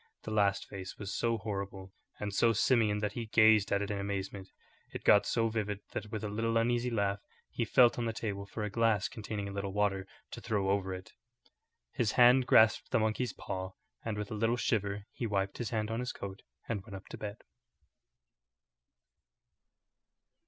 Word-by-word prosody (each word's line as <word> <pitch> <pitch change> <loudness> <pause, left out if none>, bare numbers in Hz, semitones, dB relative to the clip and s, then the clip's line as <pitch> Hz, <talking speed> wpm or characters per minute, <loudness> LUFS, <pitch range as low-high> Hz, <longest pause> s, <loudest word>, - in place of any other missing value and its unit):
The 110 - -5
last 100 -2 +2
face 95 -2 -8
was 100 -1 -5
so 115 -1 +1
horrible 100 -2 -5 0.3
and 105 -1 -3
so 115 +3 +4
simian 110 -2 +2
that 105 -1 0
he 115 +1 -5
gazed 110 -2 +5
at 100 0 +2
it 100 - -3
in 100 - -2
amazement. 100 -1 -4 0.4
It - - -7
got 100 - +5
so 115 -1 +2
vivid 105 -2 -2
that, 105 - -5
with 110 -2 -4
a - - -1
little 115 +2 0
uneasy 120 +1 +1
laugh, 100 -3 0 0.3
he - - -1
felt 120 -1 +5
on 120 - -1
the 115 - 0
table 100 -3 -4
for 105 +1 -5
a 105 - -2
glass 110 -2 +2
containing 105 -4 -5
a - - -5
little 100 -1 -4
water 100 -2 0 0.2
to - - -7
throw 100 -3 0
over 95 -1 0
it. 95 0 -8 0.8
His 110 - 0
hand 125 +1 +6
grasped 110 0 +5
the - - +2
monkey's 110 +3 0
paw, 95 0 -5 0.3
and 110 -2 -3
with 105 -1 -4
a - - -2
little 115 +3 +1
shiver 100 -4 -1
he 120 - -3
wiped 100 -2 -1
his 120 - -2
hand 110 -2 -2
on 115 - -1
his 125 +1 -3
coat 100 0 -7 0.3
and 110 -4 -2
went 100 0 -10
up 95 - -9
to - - -7
bed. 105 0 -6
105 Hz, 190 wpm, -32 LUFS, 100-115 Hz, 0.8 s, hand